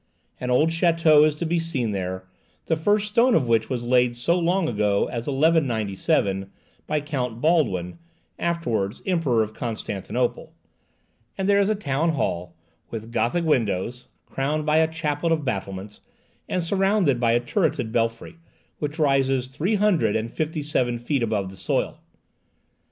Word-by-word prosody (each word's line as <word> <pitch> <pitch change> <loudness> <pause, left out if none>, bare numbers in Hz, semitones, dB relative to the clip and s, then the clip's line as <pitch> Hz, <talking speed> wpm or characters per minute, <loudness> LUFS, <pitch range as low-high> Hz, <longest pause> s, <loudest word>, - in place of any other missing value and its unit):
An 125 - -4
old 135 +6 +3
château 165 -2 +4
is 150 - -1
to 170 - -3
be 170 +1 +1
seen 140 -9 -2
there, 95 -1 -4 0.4
the 160 - +1
first 205 +6 +1
stone 235 +3 +4
of 135 -6 +2
which 115 -1 +2
was 120 -3 -3
laid 125 -1 +3
so 120 +9 +1
long 175 +1 +1
ago 105 -4 +1
as 120 -1 -5
1197, 110 - +1 0.4
by 155 - 0
Count 125 -6 -3
Baldwin, 125 - +1 0.4
afterwards 120 -13 -1
Emperor 155 - +2
of 110 0 -7
Constantinople; 115 +1 -3 0.8
and 190 - -1
there 200 0 +4
is 200 - +1
a 215 - +2
Town 160 -3 0
Hall, 85 - -2 0.3
with 115 0 -7
Gothic 165 +9 0
windows, 120 - 0 0.2
crowned 150 +3 -2
by 155 0 +3
a 160 0 +3
chaplet 160 0 -1
of 155 -3 0
battlements, 100 -3 -4 0.5
and 180 - 0
surrounded 190 - +2
by 115 -1 +3
a 120 - +4
turreted 120 - -1
belfry, 115 +7 -2 0.4
which 150 +1 -3
rises 135 -4 +2
three 150 +11 -1
hundred 185 - +2
and 115 +1 -2
fifty 155 -1 -2
seven 125 -5 0
feet 125 +3 -1
above 105 -5 -1
the - - -11
soil. - - -1
135 Hz, 155 wpm, -24 LUFS, 115-165 Hz, 0.8 s, château